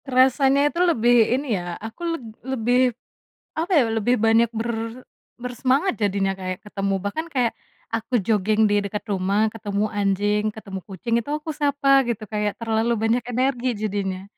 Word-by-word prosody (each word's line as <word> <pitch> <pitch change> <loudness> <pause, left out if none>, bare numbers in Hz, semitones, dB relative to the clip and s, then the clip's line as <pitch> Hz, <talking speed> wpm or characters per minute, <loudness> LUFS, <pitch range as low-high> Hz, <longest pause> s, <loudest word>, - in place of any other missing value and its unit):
Rasanya 270 +2 +4
itu 340 - -3
lebih 245 -10 +3 0.2
ini 270 -4 -2
ya 175 -1 -5
aku 225 +8 -9 0.2
leb 260 - -14 0.2
lebih, 245 -1 0 0.8
apa 325 +3 -3
ya, 280 - +6
lebih 225 +3 +2
banyak 225 +1 +4
ber 230 +2 -1 0.7
bersemangat 255 - 0
jadinya 195 -1 +1
kayak 185 -1 -6
ketemu 200 -1 -2
bahkan 315 +11 -3
kayak, 250 -7 0 0.4
aku 230 +3 -1
jogging 215 0 +2
di 205 0 +3
dekat 200 +1 -4
rumah 200 +3 +1
ketemu 205 -2 -2
anjing, 205 +1 +1
ketemu 195 -3 -7
kucing 230 +4 -3
itu 235 - -11
aku 300 +1 -3
sapa 285 -2 +3
gitu 225 -2 -2
kayak 210 -1 -2
terlalu 225 0 0
banyak 230 +2 +2
energi 255 +1 0 0.2
jadinya. 195 -2 -2
225 Hz, 155 wpm, -23 LUFS, 205-255 Hz, 0.8 s, ya